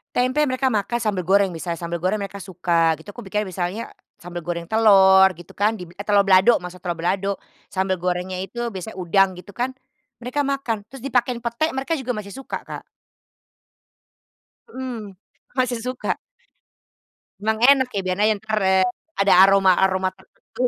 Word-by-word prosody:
Tempe 255 +5 +2
mereka 260 0 0
makan, 235 +1 -1
sambel 195 -5 -1
goreng 195 +1 +4
bisa 170 0 -4
sambel 170 0 -4
goreng 185 +5 -1
mereka 200 0 -6
suka 170 -3 +1
gitu. 205 - -13
Aku 225 +2 -10
bikin 210 0 -2
misalnya 185 +5 -4 0.3
sambel 175 -1 -7
goreng 170 -1 -4
telur, 195 -4 +6
gitu 175 0 -15
kan 210 +2 +2
dib 180 -5 -8
eh 200 - -6
telor 205 -1 +4
balado, 195 +4 +5
masak 180 0 -10
telor 175 - 0
balado. 190 +4 -2 0.2
Sambel 190 0 -1
gorengnya 180 +1 -2
itu 235 +6 -4
biasanya 195 0 -7
udang 190 +1 +2
gitu 180 +2 -13
kan. 255 +2 -1 0.5
Mereka 275 +4 -1
makan 240 -7 -2
terus 265 +2 -12
dipakein 250 -2 0
pete, 235 +7 -1
mereka 275 +5 -2
juga 255 -2 -3
masih 210 -2 -6
suka, 270 +6 -6
Kak. - - -8 1.9
Mhm, 230 -7 -6 0.4
masih 250 -2 +1
suka. 255 0 -2 1.3
Emang 220 +1 0
enak 265 -2 +5
ya, 195 - 0
biar 185 0 -1
aja 215 +1 +4
entar, 215 +1 -2
eee, 190 -1 +4 0.3
ada 195 0 +4
aroma-aroma 190 -1 +3
tertentu. 220 +5 -9
200 Hz, 165 wpm, -22 LUFS, 185-235 Hz, 1.9 s, telur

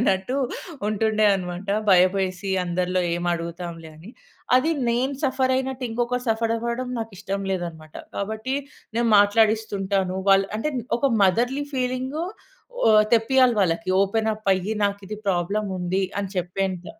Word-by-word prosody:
అన్నట్టు 195 +2 +1 0.5
ఉంటుండే 215 0 +1
అనమాట. 180 +1 -5 0.2
భయపేసి 185 +1 +3
అందరిలో 180 +1 0
ఏమడుగుతాంలే 170 -1 -4
అని. 180 +8 -12 0.5
అది 310 +6 +2 0.2
నేను 255 +4 0
సఫర్ 260 -1 +1
అయినట్టు 265 -1 -3
ఇంకొకరు 240 +2 -1
సఫరవ్వడం 230 +2 -1
నాకిష్టం 200 -2 -4
లేదనమాట. 165 -4 -6 0.2
కాబట్టి 220 +6 -3 0.4
నేను 235 0 +2
మాట్లాడిస్తుంటాను 205 -3 +2
వాళ్ళు 195 0 +4
అంటే 300 +8 -1 0.3
ఒక 275 0 +2
మదర్‌లీ 245 +9 +1
ఫీలింగ 255 +2 -2 0.7
ఓ - - +6 0.3
తెప్పియాలి 245 +1 +4
వాళ్ళకి. 170 0 0
ఓపెనప్పయ్యి. 210 -1 0
నాకిది 200 +1 -3
ప్రాబ్లముంది 190 0 -1 0.2
అని 195 -1 -4
చెప్పేంత. 180 0 -2
200 Hz, 110 wpm, -24 LUFS, 185-235 Hz, 0.7 s, ఓ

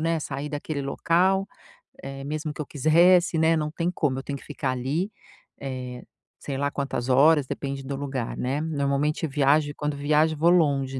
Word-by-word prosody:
né, 165 0 +1
sair 145 +1 -4
daquele 145 0 -4
local, 180 +7 +1 0.6
eh, 135 0 -7
mesmo 155 +1 -4
que - - -6
eu 150 - -4
quisesse, 170 +4 +4
né, 160 +1 +4
não 150 -1 -2
tem 165 +2 -1
como. 145 -7 -1
Eu 135 - -8
tenho 140 -1 -4
que - - -15
ficar 140 -2 -3
ali, 140 - -2 0.5
eh, 125 -2 -6 0.4
sei 140 -2 -5
lá 140 +1 0
quantas 135 -4 -3
horas. 145 +2 +5
Depende 135 0 -4
do 135 +1 -4
lugar, 135 -4 -4
né. 135 +4 -1
Normalmente, 150 0 0 0.5
quando 150 -1 -2
viajo, 150 +2 +2
vou 165 +3 +4
longe, 140 -6 +2
145 Hz, 175 wpm, -25 LUFS, 135-160 Hz, 0.6 s, horas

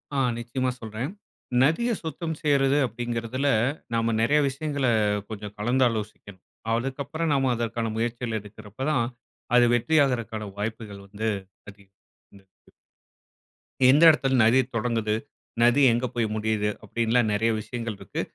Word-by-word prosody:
ஆ, - - 0 0.2
நிச்சயமா 120 +2 -2
சொல்றேன். 110 +4 -4 0.5
நதிய 165 - +2
சுத்தம் 160 0 -4
செய்றது 140 -2 +3
அப்டிங்கிறதுல 120 +3 -3 0.5
நாம 115 0 +1
நிறைய 145 +7 +3
விஷயங்கள 140 0 -2 0.4
கொஞ்சம் 105 -1 -7
கலந்து 125 +5 +2
ஆலோசிக்கணும். 105 -4 -7 0.3
அதுக்கு 130 +4 -2
அப்பறம் 160 +2 -2
நாம 135 -2 +2
அதற்கான 115 -1 -2
முயற்சிகள் 115 0 -2
எடுக்கிறப்பதான் 110 +6 -3 0.5
அது 120 0 +6
வெற்றியாகுறக்கான 120 -6 +1
வாய்ப்புகள் 105 -2 -5
வந்து 105 +3 -4 0.4
அதிகம். 100 -1 -18 0.4
ம். 95 - -27 1.4
எந்த 145 +5 +5
இடத்துல 135 -3 +2
நதி 115 +4 +5 0.2
தொடங்குது? 115 -2 0 0.5
நதி 120 +4 +5
எங்கே 120 +2 0
போய் 115 -2 +1
முடியுது? 110 -1 0
அப்பிடின்லாம் 115 0 +1
நிறைய 110 +2 +2
விஷயங்கள் 115 -2 -5
இருக்கு. - - -4
115 Hz, 120 wpm, -25 LUFS, 110-135 Hz, 1.4 s, அது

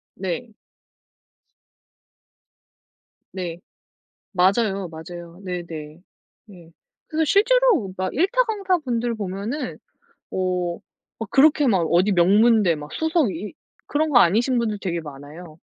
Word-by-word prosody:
네. 190 +5 -4 2.9
네. 175 -3 -5 0.7
맞아요, 195 0 +1
맞아요. 170 +2 -10
네 180 -2 -3
네. 155 0 -9 0.5
음. 175 -4 -15 0.4
그래서 320 +1 0
실제로 425 - +3
막 185 0 -2
1 330 +7 +3
타 - - +4
강사분들 340 - -1
보면 215 +7 -4 0.5
뭐 180 -2 -2 0.4
막 225 -3 -6
그렇게 295 +1 +5
막 195 -6 +3
어디 185 +4 +3
명문대 200 +1 +4
막 150 0 -9
수석 320 - +1
이 205 +5 -6 0.4
그런 310 +2 0
거 245 - +6
아니신 235 +7 +3
분들 220 -3 -1
되게 170 -4 -3
많아요. 155 +3 -11
195 Hz, 200 characters per minute, -22 LUFS, 175-255 Hz, 2.9 s, 거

